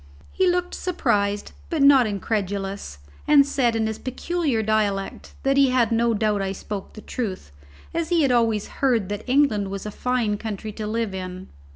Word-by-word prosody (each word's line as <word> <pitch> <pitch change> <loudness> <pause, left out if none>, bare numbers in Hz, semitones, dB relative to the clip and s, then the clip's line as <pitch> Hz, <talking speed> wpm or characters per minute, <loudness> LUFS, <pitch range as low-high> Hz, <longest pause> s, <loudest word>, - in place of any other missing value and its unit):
He 375 -1 +2
looked 355 0 0
surprised, 205 - 0 0.2
but 320 -5 +1
not 275 -4 +7
incredulous, 200 - -3 0.3
and 290 -2 +7
said 255 -5 +1
in 225 -1 +1
his 220 0 -3
peculiar 265 -2 -1
dialect 205 -2 -1
that 275 0 +2
he 275 -1 +5
had 250 -2 +2
no 230 0 +2
doubt 210 -1 +1
I 195 0 -2
spoke 200 0 -6
the 215 - -10
truth, 195 - -5 0.4
as 335 -1 -1
he 340 -3 +3
had 270 - +3
always 225 -4 +2
heard 235 -8 +2
that 205 +1 -4
England 250 -8 +3
was 195 0 -5
a 210 - -4
fine 235 -3 -1
country 215 -1 -5
to 210 0 -5
live 225 -2 -2
in. 185 0 -6
220 Hz, 180 wpm, -23 LUFS, 205-265 Hz, 0.4 s, not